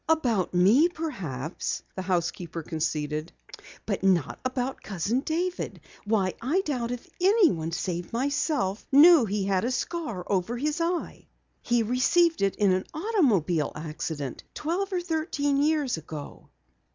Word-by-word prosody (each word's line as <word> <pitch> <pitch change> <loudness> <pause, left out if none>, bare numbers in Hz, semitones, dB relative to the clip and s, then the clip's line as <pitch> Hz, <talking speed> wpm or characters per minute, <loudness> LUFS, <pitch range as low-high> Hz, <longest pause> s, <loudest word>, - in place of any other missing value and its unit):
"About 245 - +2
me, 220 - +5
perhaps," 180 - -4
the 190 - -4
housekeeper 170 -2 -2
conceded. 155 0 -2 0.5
"But 200 -3 -2
not 185 -7 +2
about 255 0 -2
Cousin 205 +5 -1
David. 345 +5 -2 0.3
Why, 205 -3 +1
I 300 +11 +1
doubt 255 -9 -2
if 245 -1 -5
anyone 355 - +3
save 175 0 -3
myself 260 - 0
knew 300 -1 +8
he 205 -1 -1
had 190 -1 +1
a 240 - 0
scar 255 - -3
over 200 +5 -1
his 300 +5 -1
eye. 340 +1 -2 0.3
He 240 -1 +2
received 285 +8 +2
it 195 -1 +2
in 200 -2 +3
an 185 0 0
automobile 240 - +1
accident 150 -3 -5
twelve 365 +6 -2
or 365 -2 0
thirteen 310 -4 0
years 295 - +1
ago." 155 -2 -9
235 Hz, 135 wpm, -27 LUFS, -, 0.5 s, knew